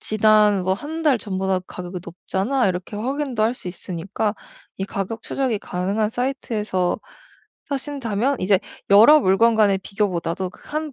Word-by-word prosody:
지난 215 -2 +4
뭐 185 - +1
1 315 +8 -6
달 290 -5 +4
전보다 190 -2 -1
가격이 180 0 -6
높잖아 195 +8 -1
이렇게 185 +3 -4
확인도 260 0 -2
할 230 +3 +2
수 185 - -7
있으니까 190 +4 -3 0.4
이 195 - -1
가격 200 +3 -4
추적이 255 -6 -1
가능한 200 +5 -1
사이트에서 220 -7 -1 0.7
사신다면 270 -3 -1
이제 190 0 +3 0.3
여러 225 +10 +8
물건간의 210 0 +4
비교보다도 185 -3 -2
그 - - -18
한 305 -1 -3
210 Hz, 320 characters per minute, -22 LUFS, 190-245 Hz, 0.7 s, 여러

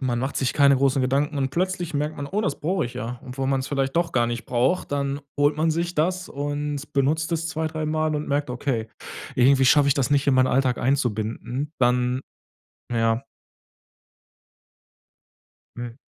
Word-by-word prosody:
man 125 -3 0
macht 135 +2 -2
sich 130 - 0
keine 140 -1 +5
großen 135 0 +2
Gedanken 140 +3 +1
und 135 -1 0
plötzlich 175 -1 -2
merkt 150 +2 -1
man: 145 - -4
„Oh, 205 +7 -1
das 150 - -2
brauche 175 +1 0
ich 125 - -10
ja.“ 120 0 -5
Obwohl 130 +1 -3
man's 135 0 0
vielleicht 135 +1 -1
doch 170 0 +1
gar 120 -1 +2
nicht 120 -1 -4
braucht, 130 +7 0
dann 140 0 -1 0.2
holt 145 +1 +3
man 160 +1 +2
sich 170 +2 -1
das 180 +4 0
und 145 +1 -4
benutzt 155 +4 +1
es 165 0 -1
2, 160 -1 -2
3 155 0 -3
Mal 155 0 0
und 150 0 -3
merkt, 145 -1 0
okay, 125 -3 -2 0.5
irgendwie 135 +2 +5
schaffe 140 +2 +5
ich 140 - +4
das 140 0 0
nicht 145 0 +2
in 135 - +4
meinen 130 0 +4
Alltag 130 -1 +1
einzubinden. 125 +1 -1
Dann, 125 +1 +2 0.7
ja. 115 +2 +1 2.5
Mhm. 120 +1 -6
140 Hz, 180 wpm, -24 LUFS, 130-155 Hz, 2.5 s, keine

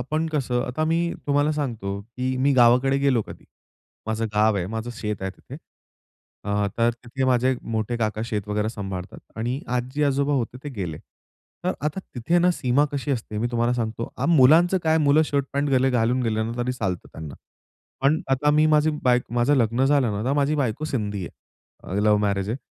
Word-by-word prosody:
आपण 155 +6 -1
कसं 125 -4 0
आता 140 +6 -1
मी 170 +1 0
तुम्हाला 145 +1 +2
सांगतो 115 -9 -3
की 125 +4 -4
मी 140 +2 +2
गावाकडे 125 +2 +4
गेलो 135 -5 +2
कधी. - - -11 0.6
माझं 110 +1 -1
गाव 105 0 +3
आहे, 90 - -2
माझं 110 +3 -4
शेत 105 -3 -4
आहे 95 - -2
तिथे. 95 - -12 0.9
अ, 105 0 0
तर 115 0 +4
तिथे 130 +2 -3
माझे 130 0 +2
मोठे 115 +1 -2
काका 110 -1 -1
शेत 105 -3 -4
वगैरे 105 +1 0
सांभाळतात 95 -4 -6 0.2
आणि 120 +5 -2 0.2
आजी-आजोबा 140 +3 0
होते 125 0 -2
ते - - -3
गेले. 85 -6 -4 0.7
तर 185 - +1
आता 150 +6 -2
तिथे 140 +8 +1
ना 180 +1 +4
सीमा 135 -1 +2
कशी 145 0 -3
असते 110 -4 -3
मी 120 - 0
तुम्हाला 120 0 +1
सांगतो 115 -1 -3
आ, - - -1
मुलांचं 165 +4 +5
काय 160 0 +3
मुलं 150 +1 +4
शर्ट 140 -2 0
पॅन्ट 140 0 0
गेले 130 0 +3
घालून 125 +1 +1
गेले 110 -2 0
ना 115 +1 -3
तरी 125 +1 -1
चालतं 95 -8 -3
त्यांना. 75 -3 -8 0.7
पण 140 +4 +3
आता 135 +3 +3
मी 150 +1 +4
माझी 155 0 +3
बायक 125 -1 +3
माझं 120 +4 +3
लग्न 120 +2 +2
झालं 135 -6 +2
ना, 100 +1 -3
तर 135 - +1
माझी 145 +1 +2
बायको 140 0 -1
सिंधी 105 - -3
आहे, - - -9 0.6
अ, 95 - -3
लव्ह 105 0 +4
मॅरेज 100 -1 0
आहे. 120 - -1
125 Hz, 195 wpm, -24 LUFS, 110-140 Hz, 0.9 s, मुलांचं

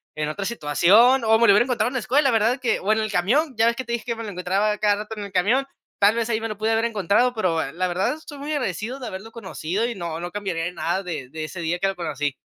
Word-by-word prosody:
en 155 0 -2
otra 195 +5 -4
situación, 225 - +4
o 220 0 +4
me 235 - +5
lo - - +7
hubiera 205 - +5
encontrado 240 -3 0
en 255 - -4
la 260 - 0
escuela, 270 +5 +2
¿verdad?, 230 +4 +2
que 245 - +1
o 200 - +1
en 220 - 0
el 215 -1 -2
camión. 255 - +1
Ya 225 - +4
ves 235 - +2
que 260 +1 -5
te 235 - -4
dije 235 - -3
que 235 - -2
me 230 - -7
lo 210 - -5
encontraba 195 +3 0
cada 205 -1 +2
rato 215 +1 -6
en 205 - -5
el 200 - -10
camión. 215 +9 +2 0.3
Tal 205 +2 +5
vez 235 0 -1
ahí 220 - 0
me 225 - -2
lo 210 - -5
pude 220 +1 0
haber 225 +1 +2
encontrado 215 +3 +2
pero, 170 -6 0
la 185 +2 -1
verdad, 185 +10 0
estoy 305 -2 -11
muy 290 +2 -5
agradecido 250 - -3
de 250 - -7
haberlo 210 +3 -8
conocido, 190 -1 -3
y 240 - -3
no 170 -3 -5
no 175 0 -5
cambiaría 180 -4 -3
nada 175 +3 -2
de 155 -8 -6
ese 160 +3 -5
día 170 +2 -1
que 195 - +1
lo 195 - -2
conocí. 145 -5 -3
210 Hz, 285 wpm, -23 LUFS, 180-235 Hz, 0.3 s, lo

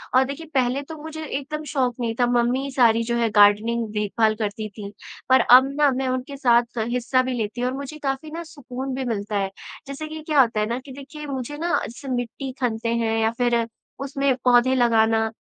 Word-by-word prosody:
और 260 - +6
देखिए 280 +4 -6
पहले 260 0 +1
तो 320 +3 -9
मुझे 315 0 -7
एकदम 300 +2 -4
शौख 255 -4 0
नहीं 230 -2 -1
था 245 - +4
मम्मी 245 +3 +1
सारी 230 -3 +4
जो 235 +1 -1
है 230 -1 +1
गार्डनिंग 210 +3 +4
देखभाल 215 +1 +1
करती 215 0 -3
थीं। 205 -2 -6 0.4
पर 260 0 +6
अब 255 +3 +7
ना 295 -1 +5
मैं 265 0 -1
उनके 255 +2 -3
साथ 240 -3 +4
स 220 - 0
हिस्सा 250 +1 +1
भी 255 0 -2
लेती 220 +2 -3
हूँ 250 - +1
और 260 - -4
मुझे 280 +2 -7
काफ़ी 270 +3 -3
ना 335 +2 -5
सुकून 270 -4 -7
भी 265 - -3
मिलता 210 -3 -2
है। 195 -1 -1 0.4
जैसे 280 +3 -6
कि 315 0 -7
क्या 305 -3 +3
होता 230 -4 +1
है 210 - +1
ना 240 +2 -2
कि 275 - -10
देखिए 280 +3 -9
मुझे 275 +1 -5
ना 335 +3 -2 0.2
ऐसे 245 +4 -10
मिट्टी 250 +2 -3
खनते 230 -1 -1
हैं 225 -1 0
या 220 0 +2
फिर 240 -2 +2 0.3
उसमें 275 -1 0
पौधे 250 +1 +5
लगाना, 225 -2 +3
250 Hz, 215 wpm, -23 LUFS, 230-275 Hz, 0.4 s, अब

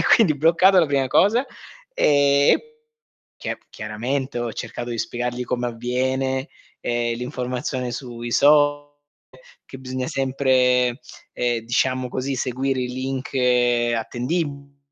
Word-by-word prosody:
e - - 0
quindi 175 -10 +3
bloccato 170 +5 +5
la 165 - +4
prima 140 -2 0
cosa 205 - +3 0.5
e 140 - +4
e 460 0 -1 0.6
chia - - -4
chiaramente 120 +5 -3
ho 120 -1 -3
cercato 120 +2 -6
di 115 - -4
spiegargli 120 +2 -3
come 125 0 -2
avviene, 130 +3 -1 0.3
ehm, 120 -1 -1
l'informazione 125 +1 -3
sui 120 -1 -6
social 145 +2 +4 0.8
che 135 - -10
bisogna 130 0 -4
sempre, 130 -2 +2 0.3
ehm, 120 -1 0
diciamo 130 +2 0
così, 135 +2 -3
seguire 130 +1 -1
i 125 - -2
link 130 +1 -4 0.6
attendibili 140 +4 -3
130 Hz, 120 wpm, -22 LUFS, 120-140 Hz, 0.8 s, bloccato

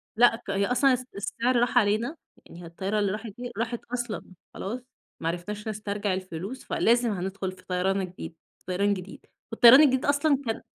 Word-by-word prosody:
لأ 240 0 +5
ك 225 -3 -13
هي 200 0 +1
أصلا 255 +3 +3
الس 255 0 -2
السعر 235 +5 -1
راح 245 +1 +1
علينا، 230 +7 +2 0.3
يعني 170 - -12
هي 175 - -9
الطيارة 195 +5 -2
اللي 200 -2 +1
راحت 215 +2 -5
دي 245 0 -6
راحت 230 +1 -2
أصلًا، 240 -3 -3 0.3
خلاص. 235 +6 -5 0.4
ما 165 - -3
عرفناش 205 +6 -4
نسترجع 205 -2 -2
الفلوس، 185 +6 -5
فلازم 240 0 +2
هندخل 190 0 -3
في 185 - -16
طيران 190 +2 0
الجديد، 180 -2 -7 0.2
في - - -34
طيران 200 +2 +1
جديد، 190 0 -8 0.3
والطيران 240 +5 +9
الجديد 265 -1 +3
أصلًا 285 0 +3
كان 225 -1 -2
210 Hz, 185 wpm, -27 LUFS, 190-245 Hz, 0.4 s, والطيران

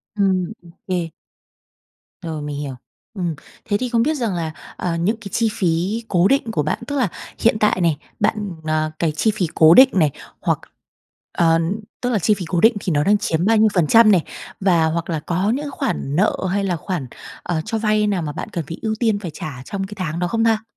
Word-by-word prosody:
Ừm, 190 -1 +1
ô 170 - -16 0.2
kê. 175 -3 -1 1.1
Rồi, 160 -3 -5
mình 145 -1 -5
hiểu. 140 -3 -5 0.4
Ừm. 175 -6 -2 0.3
Thế 205 -1 +1
thì 250 +1 -3
không 230 -1 +2
biết 310 +3 +1
rằng 230 -6 -1
là, 165 -2 -2 0.3
à, 170 -2 -2
những 195 +7 +1
cái 200 - -7
chi 230 -2 +1
phí 185 +6 0
cố 180 0 +3
định 265 -4 +1
của 150 -8 0
bạn, 150 - -1
tức 285 - -3
là 250 - +2 0.3
hiện 225 -1 +3
tại 210 -3 +2
này, 165 -4 +2 0.2
bạn, 205 -2 0 0.2
ờ, 155 0 0
cái 165 -2 +1
chi 215 +8 +1
phí 180 - 0
cố 160 +1 +7
định 260 +4 +8
này, 155 -7 +3 0.3
hoặc - - +1 0.8
ờ, 165 -1 +4 0.4
tức 245 - 0
là, 225 - +1
chi 210 +4 +3
phí 195 -3 -4
cố 175 -2 +1
định 225 +1 +6
thì 185 - -2
nó 145 0 +2
đang 205 +1 +4
chiếm 170 -4 -1
bao 225 +2 +4
nhiêu 220 0 +5
phần 170 -5 +2
trăm 225 -2 +7
này? 180 -5 +4 0.4
Và 175 -4 +3
hoặc 165 +2 -2
là 160 - -1
có 180 +6 -1
những 290 0 -4
khoản 150 - -2
nợ 200 +5 +3 0.2
hay 200 +2 0
là 185 -3 0
khoản, 165 -3 -4 0.4
à, 160 -2 -1
cho 225 - -2
vay 215 -1 +2
nào 195 -4 0
mà 150 -2 -3
bạn 150 - -6
cần 165 -4 -4
phải 165 - -6
ưu 220 -1 -1
tiên 220 -4 +2
phải 180 -6 -6
trả 135 -5 -7
trong 195 -1 -4
cái 205 - -9
tháng 165 -3 -3
đó 180 - 0
không 225 +4 0
ta? 220 -1 +2
185 Hz, 230 wpm, -20 LUFS, 165-215 Hz, 1.1 s, định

